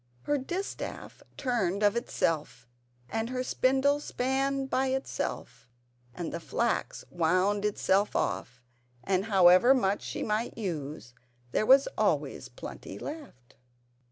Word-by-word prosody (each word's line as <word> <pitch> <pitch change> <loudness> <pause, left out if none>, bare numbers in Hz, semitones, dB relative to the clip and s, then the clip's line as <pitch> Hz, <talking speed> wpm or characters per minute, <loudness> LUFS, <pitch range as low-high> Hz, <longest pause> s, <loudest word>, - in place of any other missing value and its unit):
Her 290 -1 +1
distaff 355 +9 -5 0.2
turned 210 -7 0
of 205 +1 +4
itself 165 - -2 0.4
and 225 - -2
her 255 0 -2
spindle 270 +3 +2
span 270 0 -1
by 265 0 0
itself 265 - -4 0.5
and 170 -2 -4
the 170 - -3
flax 235 +8 -2
wound 185 +5 +1
itself 205 -1 +1
off; 125 0 -2 0.4
and 190 0 +1
however 195 +4 +6
much 200 -5 +1
she - - -4
might 215 +3 -2
use 150 - -5 0.4
there 215 - +1
was 270 +1 +7
always - - 0
plenty - - -9
left. 280 - -9
215 Hz, 120 wpm, -29 LUFS, 180-265 Hz, 0.5 s, was